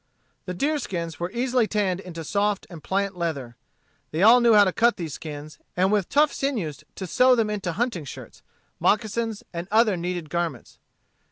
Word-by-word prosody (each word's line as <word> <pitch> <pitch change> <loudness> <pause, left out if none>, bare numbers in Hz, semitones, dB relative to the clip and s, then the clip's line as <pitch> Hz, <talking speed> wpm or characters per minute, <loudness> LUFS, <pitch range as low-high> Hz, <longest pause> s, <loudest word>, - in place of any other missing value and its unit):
The 180 - -4
deerskins 185 - -2
were 175 +1 -2
easily 245 0 +1
tanned 195 -4 0
into 170 -4 -7
soft 205 +4 0
and 160 -4 -10
pliant 195 0 -1
leather. 145 -9 -3 0.5
They 160 +4 -1
all 235 +4 +8
knew 235 -2 +5
how 205 - +8
to 185 -2 +1
cut 235 +1 +3
these 165 -6 -5
skins, 150 -1 -8 0.2
and 190 +2 +3
with 205 -4 +1
tough 295 0 +3
sinews 200 - -2
to 190 - -5
sew 250 +8 +4
them 220 -3 +1
into 190 -5 -2
hunting 215 - -2
shirts, 135 - -10 0.4
moccasins, 220 0 0
and 170 +1 -5
other 220 -1 +4
needed 175 -3 -4
garments. 170 -1 -3
195 Hz, 175 wpm, -25 LUFS, 170-225 Hz, 0.5 s, all